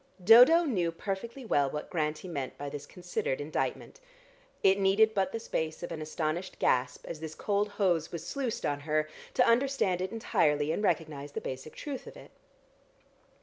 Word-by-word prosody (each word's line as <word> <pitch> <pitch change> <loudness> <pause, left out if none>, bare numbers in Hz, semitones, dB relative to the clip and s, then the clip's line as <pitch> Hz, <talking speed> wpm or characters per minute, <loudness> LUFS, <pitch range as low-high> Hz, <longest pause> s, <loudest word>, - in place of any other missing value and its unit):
Dodo 250 - +8
knew 185 - 0
perfectly 210 +9 -5
well 145 -10 +2
what 150 +2 -6
Grantie 155 0 -2
meant 140 -7 -5
by 145 0 -5
this 145 0 -7
considered 175 -7 -3
indictment. 155 - -3 0.6
It 195 +1 +5
needed 200 +3 +4
but 195 -2 0
the 225 - -3
space 160 -7 -3
of 175 - -5
an 160 -2 -5
astonished 155 +3 -3
gasp, 125 0 +1
as 160 - -6
this 160 0 -7
cold 205 0 0
hose 185 -6 0
was 170 - -6
sluiced 265 -5 -3
on 145 -1 0
her, 155 +1 0 0.3
to - - +5
understand 230 -7 +2
it 185 - -2
entirely, 150 -9 +1
and 185 - -1
recognise 150 -6 -1
the - - -2
basic 130 +4 -7
truth 280 -3 -6
of - - -10
it. - - -14
175 Hz, 175 wpm, -30 LUFS, 150-215 Hz, 0.6 s, Dodo